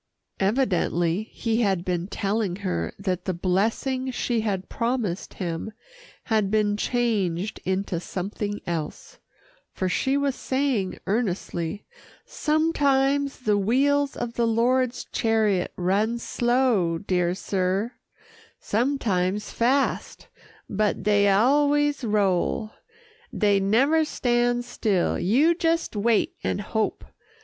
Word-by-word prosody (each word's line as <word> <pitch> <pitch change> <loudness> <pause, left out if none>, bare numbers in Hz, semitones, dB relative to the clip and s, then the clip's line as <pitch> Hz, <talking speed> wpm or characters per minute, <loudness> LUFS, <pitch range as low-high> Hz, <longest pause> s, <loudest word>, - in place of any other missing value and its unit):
Evidently 195 -4 +1
he 230 0 -1
had 190 -5 +1
been 180 -1 -1
telling 200 -2 -1
her 180 - -1
that 185 -2 -3
the 185 - -1
blessing 225 +9 0
she 240 -2 -1
had 195 -4 -2
promised 230 -6 -2
him 170 +3 -4 0.5
had 215 -4 +1
been 210 -1 +2
changed 210 -5 -1
into 190 -1 -1
something 205 +3 -4
else, 165 -3 -5 0.5
for 185 - -2
she 265 +9 +1
was 280 -1 +1
saying 260 -9 -1
earnestly, 195 -3 -2 0.4
"Sometimes 285 -3 +1
the 210 -4 +2
wheels 280 +7 +2
of 240 -1 -4
the 235 0 +1
Lord's 245 +2 +1
chariot 220 -5 +1
run 205 +6 +1
slow, 240 -8 +1
dear 180 -1 0
Sir, 195 +3 -1 0.7
sometimes 210 -5 0
fast, 265 +4 0 0.4
but 210 -1 0
dey 205 0 +4
always 290 +7 +3
roll. 210 0 +1 0.7
Dey 205 -2 +3
never 265 +11 +3
stand 245 -4 0
still. 210 -6 0
You 270 - +3
jes' 330 0 +1
wait 220 +1 +1
an' - - 0
hope. 215 +2 -2
215 Hz, 110 wpm, -25 LUFS, 190-250 Hz, 0.7 s, dey